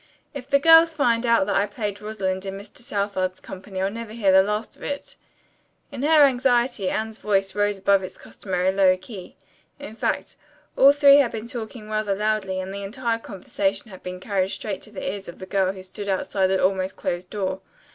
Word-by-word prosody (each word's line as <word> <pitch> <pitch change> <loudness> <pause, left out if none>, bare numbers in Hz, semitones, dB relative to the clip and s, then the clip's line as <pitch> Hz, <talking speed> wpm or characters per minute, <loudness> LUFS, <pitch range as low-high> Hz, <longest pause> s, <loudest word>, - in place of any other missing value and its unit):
If 270 -3 -7
the 280 0 +4
girls 325 +2 +6
find 240 -5 +1
out 230 -4 +4
that 205 - -1
I 200 +1 +2
played 205 -1 -5
Rosalind 195 -3 -3
in 195 0 -5
Mr. 205 +1 -12
Southard's 200 -5 -2
company 190 0 -6
I'll 195 - 0
never 230 0 -7
hear 210 -4 +2
the 190 0 +7
last 210 +3 -3
of - - -22
it." 285 0 -5 0.8
In - - -6
her 305 +1 +6
anxiety 245 -6 +2
Anne's 220 0 -3
voice 195 -2 0
rose 205 -1 0
above 195 0 +3
its 185 - -8
customary 185 -1 -2
low 190 -1 +4
key. 185 0 -11 0.4
In 285 -7 -9
fact, - - -2 0.4
all 275 +1 +7
three 285 -1 +7
had 275 -5 +3
been 220 0 -6
talking 230 -2 -7
rather 215 -2 -1
loudly, 210 -2 -1
and 185 +1 -5
the 200 - -5
entire 230 +3 -2
conversation 200 0 -3
had 185 - -11
been 180 0 -7
carried 190 -1 -1
straight 200 -1 -5
to 215 - -11
the 195 - -6
ears 195 +1 -5
of 170 - -9
the 185 - -8
girl 190 -1 +1
who 190 -1 -10
stood 200 +2 -7
outside 190 0 0
the 190 0 +1
almost 190 0 0
closed 175 +1 -4
door. 190 -2 -3
205 Hz, 205 wpm, -23 LUFS, 190-230 Hz, 0.8 s, the